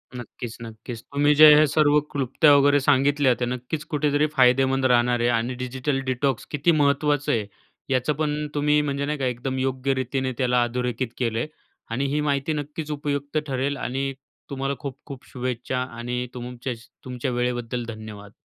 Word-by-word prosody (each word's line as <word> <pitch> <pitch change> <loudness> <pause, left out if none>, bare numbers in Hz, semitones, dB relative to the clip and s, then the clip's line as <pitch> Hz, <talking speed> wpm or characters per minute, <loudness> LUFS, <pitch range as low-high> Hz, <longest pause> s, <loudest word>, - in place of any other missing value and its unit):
नक्कीच, 120 -1 -8
नक्कीच 115 +1 -8
तुम्ही 145 +1 +2
जे 155 0 +10
हे 155 +1 +6
सर्व 150 +1 +4
क्लुप्त्या 140 +2 +3
वगैरे 145 0 +5
सांगितल्या 140 0 +3
त्या 120 - 0
नक्कीच 125 +5 -4
कुठेतरी 150 0 +2
फायदेमंद 130 -1 +3
राहणार 120 -1 +3
आहे 120 - +2
आणि 120 +1 0
डिजिटल 130 +2 -2
डिटॉक्स 130 -1 -1
किती 150 +3 +2
महत्त्वाचं 145 -1 +2
आहे. 110 -3 0 0.4
याचं 130 +3 +1
पण 150 -1 -1
तुम्ही 150 0 +3
म्हणजे 140 -1 -2
नाही 150 +1 -2
का 135 - -2
एकदम 130 +1 -2
योग्य 130 +1 0
रीतीने 130 0 -2
त्याला 125 -1 +2
अधोरेखित 125 +1 -2
केलं 115 -3 -1
आहे 150 - -2 0.4
आणि 130 +4 -1
ही 150 - +1
माहिती 145 +1 0
नक्कीच 150 +1 -5
उपयुक्त 145 0 -3
ठरेल 135 +1 -1
आणि 135 +2 -2 0.4
तुम्हाला 135 0 -2
खूप-खूप 135 -1 -8
शुभेच्छा 125 0 -3 0.2
आणि 125 +1 -3
तुमचेच 125 -1 -6 0.2
तुमच्या 125 0 -3
वेळेबद्दल 120 -1 -2
धन्यवाद. 110 -2 -9
130 Hz, 160 wpm, -24 LUFS, 125-145 Hz, 0.4 s, जे